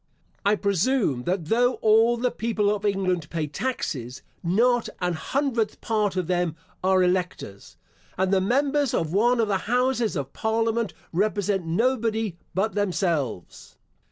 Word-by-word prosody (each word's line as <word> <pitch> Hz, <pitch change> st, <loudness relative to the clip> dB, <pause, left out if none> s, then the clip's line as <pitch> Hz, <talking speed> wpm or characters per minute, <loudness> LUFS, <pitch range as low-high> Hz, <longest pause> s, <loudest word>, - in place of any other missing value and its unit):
I 205 Hz, +1 st, +3 dB
presume, 200 Hz, -, +1 dB
that 180 Hz, -2 st, -1 dB
though 245 Hz, +8 st, +2 dB
all 225 Hz, +2 st, +4 dB
the 245 Hz, +1 st, 0 dB
people 215 Hz, -2 st, 0 dB
of 210 Hz, 0 st, -4 dB
England 185 Hz, -5 st, 0 dB
pay 160 Hz, -2 st, -2 dB
taxes, 145 Hz, -, -4 dB, 0.2 s
not 235 Hz, +7 st, +2 dB
an 180 Hz, -1 st, 0 dB
hundredth 235 Hz, -, -1 dB
part 210 Hz, -4 st, 0 dB
of 185 Hz, -2 st, 0 dB
them 175 Hz, -2 st, 0 dB, 0.3 s
are 190 Hz, 0 st, +4 dB
electors, 180 Hz, -, -2 dB, 0.4 s
and 190 Hz, +1 st, +1 dB
the 190 Hz, -, +4 dB
members 275 Hz, +6 st, +1 dB
of 160 Hz, 0 st, -1 dB
one 235 Hz, +5 st, +3 dB
of 225 Hz, -, +2 dB
the 195 Hz, -2 st, +1 dB
houses 245 Hz, -3 st, +1 dB
of 140 Hz, -3 st, -4 dB
parliament 225 Hz, -1 st, 0 dB, 0.2 s
represent 200 Hz, -1 st, 0 dB
nobody 225 Hz, 0 st, 0 dB, 0.2 s
but 205 Hz, +4 st, 0 dB
themselves. 170 Hz, -, -2 dB
205 Hz, 140 wpm, -25 LUFS, 180-230 Hz, 0.4 s, all